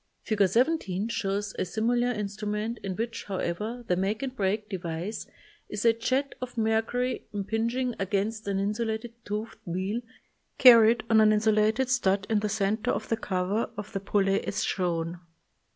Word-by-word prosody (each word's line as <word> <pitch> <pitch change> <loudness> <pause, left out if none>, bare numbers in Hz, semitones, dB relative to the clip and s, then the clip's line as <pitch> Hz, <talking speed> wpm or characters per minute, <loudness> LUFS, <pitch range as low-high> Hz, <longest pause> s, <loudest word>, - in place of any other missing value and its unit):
Fig. 215 -2 -1
17 225 - +1
shows 200 -2 -2
a - - +2
similar 240 +5 +1
instrument 210 +1 -3
in 190 -2 -4
which, 230 +2 -4
however, 210 +5 -3
the 180 - +2
make 195 +7 -1
and 260 -1 -4
break 210 0 0
device 180 +1 -4 0.4
is 210 +2 -4
a 230 - +6
jet 260 +4 -1
of 250 -1 -6
mercury 225 +3 0
impinging 230 +5 -1
against 205 +3 -1
an 200 -1 0
insulated 220 +3 -2
toothed 210 +2 -4
wheel 190 +6 -2 0.6
carried 235 -2 +8
on 220 -1 +5
an 215 - +6
insu 215 +1 +3
lated 215 +5 +2
stud 205 -6 +1
in 215 - +4
the 210 0 -1
center 210 +1 0
of 215 +2 -1
the 225 - +1
cover 195 +1 -1
of 205 0 -7
the 195 - -1
pulley 195 0 +1
as 200 - -1
shown. 170 -2 -1
215 Hz, 160 wpm, -28 LUFS, 195-230 Hz, 0.6 s, carried